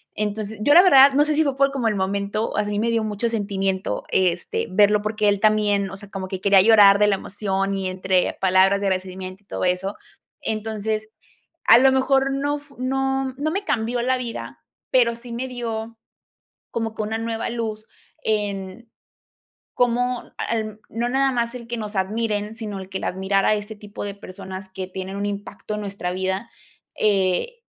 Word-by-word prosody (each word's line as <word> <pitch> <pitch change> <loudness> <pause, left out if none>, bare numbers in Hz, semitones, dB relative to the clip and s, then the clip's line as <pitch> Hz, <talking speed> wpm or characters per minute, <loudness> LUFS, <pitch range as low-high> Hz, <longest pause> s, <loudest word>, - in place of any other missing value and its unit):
Entonces, 210 0 -3
yo 290 +6 +4
la 350 - +9
verdad, 275 -6 +8
no 290 +2 +5
sé 305 - 0
si 315 - +4
fue 275 -2 -1
por 275 0 +3
como 260 -5 -1
el 215 - +1
momento, 200 +3 -2
a 210 - +2
mí 205 0 -3
me 230 +1 +1
dio 230 -1 +1
mucho 215 +2 -1
sentimiento, 195 -3 -2
este, 180 -2 0
verlo, 205 +2 +4
porque 215 0 +1
él 200 - +1
también, 210 -2 +2
o - - -7
sea, 205 0 -12
como 195 -2 -5
que 185 0 -5
quería 200 -1 +6
llorar 205 -2 +7
de 210 - +5
la 205 - +3
emoción 195 0 -2
y 190 -1 -2
entre 185 0 0
palabras 190 +1 +4
de 200 - 0
agradecimiento 185 +1 -4
y - - -44
todo - - -4
eso. 180 +2 -1 0.5
Entonces, 220 0 -3 0.6
a 230 - +8
lo 265 +1 +6
mejor, 270 +1 +2
no 290 +2 -1
fu 285 -1 -21
no 270 0 0
no 310 +2 -1
me 395 +4 -3
cambió 240 - 0
la 255 +1 +1
vida, 240 -2 -7 0.3
pero 235 -2 +4
sí 235 0 -10
me 245 +3 -3
dio 230 -2 -5 0.8
como 225 -1 -2
que 220 - -3
una 220 +1 -2
nueva 225 0 -3
luz 220 -2 -4 0.4
en 205 +1 -3 0.8
cómo 245 0 0
al 215 -2 -3
no 235 +2 -2
nada 270 +1 +2
más 235 0 -1
el 235 -2 -8
que 240 - -3
nos 210 -1 -5
admiren, 210 +2 -1
sino 210 -4 -5
el 190 - -9
que 190 - -3
la - - -2
admirar 190 +1 0
a - - +4
este 210 +1 -5
tipo 205 0 -8
de 200 - -5
personas 190 0 -9
que 190 0 -5
tienen 190 +1 -6
un 200 0 -2
impacto 205 +1 -5
en 210 - -4
nuestra 195 -3 -4
vida. 190 +4 -2 0.5
Eh, 200 - +1
215 Hz, 195 wpm, -23 LUFS, 195-235 Hz, 0.8 s, la